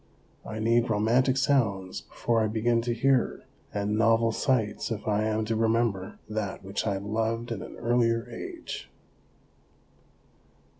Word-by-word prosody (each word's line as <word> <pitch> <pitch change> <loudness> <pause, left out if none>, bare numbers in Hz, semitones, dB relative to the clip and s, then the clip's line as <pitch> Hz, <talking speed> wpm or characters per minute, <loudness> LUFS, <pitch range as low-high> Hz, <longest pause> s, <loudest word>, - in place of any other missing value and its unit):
I 110 - -6
need 115 +2 +2
romantic 120 +5 +3
sounds 110 -9 +1
before 115 -1 0
I 110 - +2
begin 115 +2 +1
to 120 0 -1
hear, 135 -1 +2 0.3
and 105 +1 -1
novel 115 0 +4
sights 115 -4 0
if 110 -2 -4
I 105 0 +2
am 110 0 0
to 110 +1 -1
remember 110 -4 +1
that 105 -3 -3
which 95 +3 -3
I 100 -2 +1
loved 115 +3 -2
in 110 -5 -3
an - - -8
earlier 115 0 +1
age. 355 -3 -7
115 Hz, 140 wpm, -28 LUFS, 105-120 Hz, 0.3 s, novel